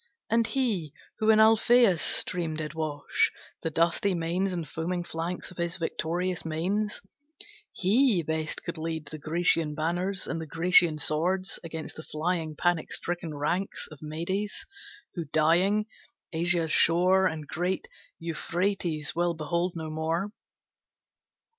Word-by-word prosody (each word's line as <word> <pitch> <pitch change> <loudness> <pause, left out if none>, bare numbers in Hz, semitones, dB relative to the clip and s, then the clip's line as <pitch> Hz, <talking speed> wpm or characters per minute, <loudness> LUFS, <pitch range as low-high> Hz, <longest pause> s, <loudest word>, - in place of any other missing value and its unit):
And 230 0 +3
he, 205 - -1 0.2
who 220 - +2
in 220 - +7
Alphēus 220 -3 +5
stream 165 -2 0
did 155 0 -4
wash 155 -3 0 0.3
The 165 - -1
dusty 170 +4 +2
manes 175 +3 0
and 170 -4 -4
foaming 175 +4 -3
flanks 170 +2 -4
Of 180 - -14
his 170 0 -1
victorious 175 +1 -2
mares, 190 +7 -1 0.7
he 210 -1 +3
best 160 0 -2
could 170 -2 -5
lead 160 -1 -3
The 155 +1 -8
Grecian 160 0 +1
banners 175 +5 -1
and 165 - -3
the 160 - -6
Grecian 165 0 +5
swords 180 +6 0
Against 160 -1 -6
the - - -6
flying, 160 0 -2
panic 175 0 0
stricken 175 -3 -1
ranks 175 +7 -2
Of 150 - -12
Medes, 170 +7 -3 0.5
who, 170 -3 -4
dying, 170 +8 +3 0.5
Asia's 165 -1 +1
shore 185 +4 +4
And 155 -3 -5
great 180 +4 -2 0.3
Euphrates 170 -1 -1
will 175 0 +1
behold 170 +3 -1
no 160 -1 -5
more. 165 +5 -1
170 Hz, 135 wpm, -28 LUFS, 160-185 Hz, 0.7 s, in